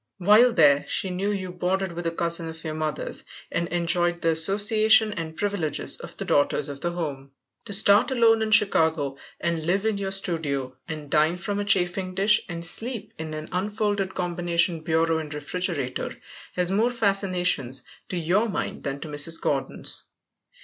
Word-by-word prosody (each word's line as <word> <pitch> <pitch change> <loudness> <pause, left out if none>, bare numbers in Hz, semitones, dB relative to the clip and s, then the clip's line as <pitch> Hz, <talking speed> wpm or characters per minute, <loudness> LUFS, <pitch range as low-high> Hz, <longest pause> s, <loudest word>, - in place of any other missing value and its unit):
While 215 +6 +6
there 145 -8 +5
she 185 +6 0
knew 190 +3 -1
you 190 -3 -3
boarded 185 +1 -1
with 170 0 -4
a - - 0
cousin 170 0 -1
of 160 0 -10
your 155 - -3
mother's, 155 -1 -3 0.3
and 170 0 -1
enjoyed 175 0 0
the 165 -1 +2
association 210 +6 +4
and 160 -4 -6
privileges 200 -7 -1
of - - -10
the - - -4
daughters 145 0 +2
of 140 -1 -7
the 175 0 -1
home. 140 -5 -5 0.3
To 205 - -4
start 200 +2 +5
alone 230 -3 +4
in 220 - 0
Chicago, 160 -9 +2 0.2
and 170 -2 -1
live 190 +5 0
in 220 -2 0
your 195 -1 -2
studio, 155 -9 -2
and 155 -3 -7
dine 155 +3 +3
from 200 +3 -3
a 205 - -2
chafing 185 -1 0
dish, 210 +2 +4
and 170 0 -5
sleep 225 +3 -5
in 160 -1 -5
an 155 0 -6
unfolded 205 0 -1
combination 175 -1 0
bureau 160 0 +1
and 155 -2 -7
refrigerator 150 -3 -3 0.4
has 180 0 0
more 220 +5 +3
fascinations 185 - 0 0.3
to 180 - -2
your 185 +7 +1
mind 195 - -3
than 140 0 -4
to - - -6
Mrs. 150 +2 0
Gordon's. - - -1
175 Hz, 170 wpm, -25 LUFS, 160-200 Hz, 0.4 s, While